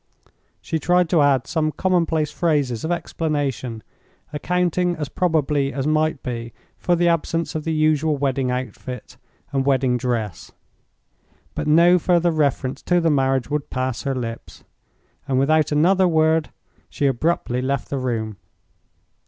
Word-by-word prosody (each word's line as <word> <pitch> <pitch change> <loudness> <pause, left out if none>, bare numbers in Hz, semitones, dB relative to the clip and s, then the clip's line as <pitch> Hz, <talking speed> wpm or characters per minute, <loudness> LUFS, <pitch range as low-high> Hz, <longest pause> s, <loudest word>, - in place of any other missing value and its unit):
She 160 - -2
tried 180 +2 +2
to 165 -2 +3
add 135 -3 +3
some 155 -2 -1
commonplace 165 -4 0
phrases 145 -9 0
of 160 - -2
explanation, 145 -9 -2 0.5
accounting 180 +3 0
as 150 -3 -4
probably 150 -5 0
as 135 -1 -3
might 155 -1 +1
be 115 -2 -5 0.3
for 175 - +2
the 175 0 +2
absence 165 0 0
of 155 -1 -4
the 165 - -1
usual 155 -1 +2
wedding 135 -2 0
outfit 125 0 -6 0.3
and 135 -1 0
wedding 130 -2 +2
dress. 115 -7 -3 1.0
But - - -4
no 170 +4 +5
further 175 0 +2
reference 140 -4 -1
to 175 0 +2
the 165 -2 +2
marriage 135 -1 +1
would 150 -1 -2
pass 130 -2 -2
her 135 -1 -2
lips, 115 -2 -6 0.6
and 135 -2 0
without 155 +4 +2
another 180 +5 +4
word 160 -1 +2 0.4
she 145 - -2
abruptly 135 -2 0
left 135 -1 -2
the 140 - -1
room. 110 -5 -3
150 Hz, 145 wpm, -22 LUFS, 130-165 Hz, 1.0 s, no